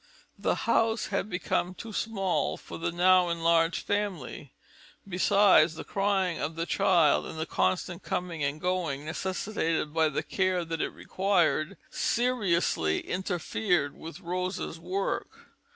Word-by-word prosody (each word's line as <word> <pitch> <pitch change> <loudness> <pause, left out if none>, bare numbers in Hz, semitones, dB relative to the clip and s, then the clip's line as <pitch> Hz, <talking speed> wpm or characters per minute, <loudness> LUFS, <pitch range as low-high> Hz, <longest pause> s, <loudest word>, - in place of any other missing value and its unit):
The - - +1
house 225 0 +2
had 200 +1 -1
become 180 -1 -1
too 225 +2 -8
small 195 -4 -1
for - - -9
the 165 - -1
now 180 +1 +4
enlarged 165 0 +2
family; 190 -10 -3 0.6
besides, 185 -3 +4
the - - -6
crying 195 -3 0
of 160 - -3
the 165 0 -2
child, 175 -5 +3
and - - -8
the 160 - -1
constant 170 - -1
coming 180 -4 -3
and 140 +2 -1
going 170 -6 -1
necessitated 165 -2 -2
by 160 -1 +3
the 145 - -2
care 185 -2 0
that 165 -1 -3
it - - 0
required 185 -3 0
seriously 190 - +1
interfered 180 -3 -1
with 165 +4 -9
Rosa's 180 -1 -3
work. 185 +4 -4
180 Hz, 135 wpm, -28 LUFS, 165-195 Hz, 0.6 s, now